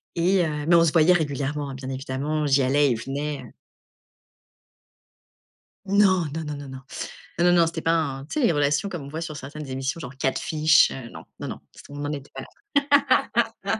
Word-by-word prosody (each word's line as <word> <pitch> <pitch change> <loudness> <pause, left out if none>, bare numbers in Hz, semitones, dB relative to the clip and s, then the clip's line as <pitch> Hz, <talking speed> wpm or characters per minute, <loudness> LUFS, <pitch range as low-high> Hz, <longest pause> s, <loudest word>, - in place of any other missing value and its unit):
et 180 +1 +3
heu, 150 -2 -3
mais 170 - +6
on 165 - +6
se 160 - +2
voyait 165 +2 +6
régulièrement 145 -3 -1
hein. - - -7
Bien 130 0 -7
évidemment, 135 +3 -2
j'y 140 0 +4
allais, 140 +2 +3
il - - +1
venait, 140 +3 -4
heu. 120 - -13 2.3
Non, 195 -3 +3
non, 160 - -3
non, 150 -1 -5
non, 145 0 -8
non, 130 0 -8 0.6
non, 175 +2 +4
non, 170 -1 +5
c'était 165 0 -4
pas 165 - +2
un 140 -5 -1
tu 235 - -3
sais, 270 - +3
les - - +3
relations 145 +4 +1
comme 175 -6 -6
on - - -9
voit 160 +3 -5
sur 155 -3 -5
certaines 145 +2 -8
émissions 135 +4 -3
genre 135 -4 -8
Catfish, 150 +3 +3
heu, 130 -3 -7
non, - - -10 0.2
non, - - -5
non, - - -6
c'était - - -14
on 145 0 -5
en 145 - -2
était 140 -2 -7
pas - - -6 1.2
la 200 +3 -1
150 Hz, 205 wpm, -24 LUFS, 135-165 Hz, 2.3 s, mais